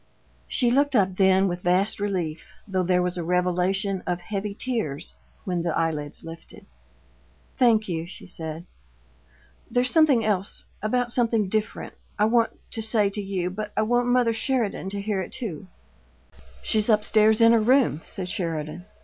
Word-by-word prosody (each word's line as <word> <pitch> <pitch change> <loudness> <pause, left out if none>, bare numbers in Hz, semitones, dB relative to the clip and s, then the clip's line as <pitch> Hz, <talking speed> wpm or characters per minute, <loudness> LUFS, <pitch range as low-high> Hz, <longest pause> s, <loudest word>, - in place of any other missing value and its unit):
She 245 -2 +2
looked 280 +2 +2
up 190 -4 +2
then 190 0 +4
with 175 -1 -3
vast 185 +4 +1
relief, 180 -6 -3 0.2
though 190 -2 0
there 180 0 +2
was 180 0 -1
a - - -2
revelation 180 +3 0
of 180 -1 -1
heavy 200 +2 -4
tears 200 - -2 0.3
when 180 -2 -1
the 170 -2 -1
eyelids 155 -3 -2
lifted. 165 0 -11 0.9
"Thank 225 -4 +4
you," 165 -2 -3
she 175 - -10
said. 165 -2 -7 1.0
"There's 250 0 +2
something 290 -8 +4
else 200 -2 -1 0.2
about 245 +3 0
something 230 -5 +1
different 215 +2 -2 0.2
I 210 - +3
want 230 +1 +2
to 225 - -2
say 215 -2 +2
to 205 - -3
you, 190 -2 -2
but 210 +2 -6
I 215 - +3
want 245 +2 +1
mother 245 -2 +3
Sheridan 225 -5 -1
to 200 +1 -4
hear 200 -2 -1
it, 185 - -7
too." 205 - -6 1.0
"She's 215 0 +1
up 210 -1 +4
stairs 215 0 +4
in 230 0 +7
her 230 -1 +4
room," 245 - +3
said 185 -2 -6
Sheridan. 165 -2 -3
200 Hz, 165 wpm, -25 LUFS, 180-225 Hz, 1.0 s, in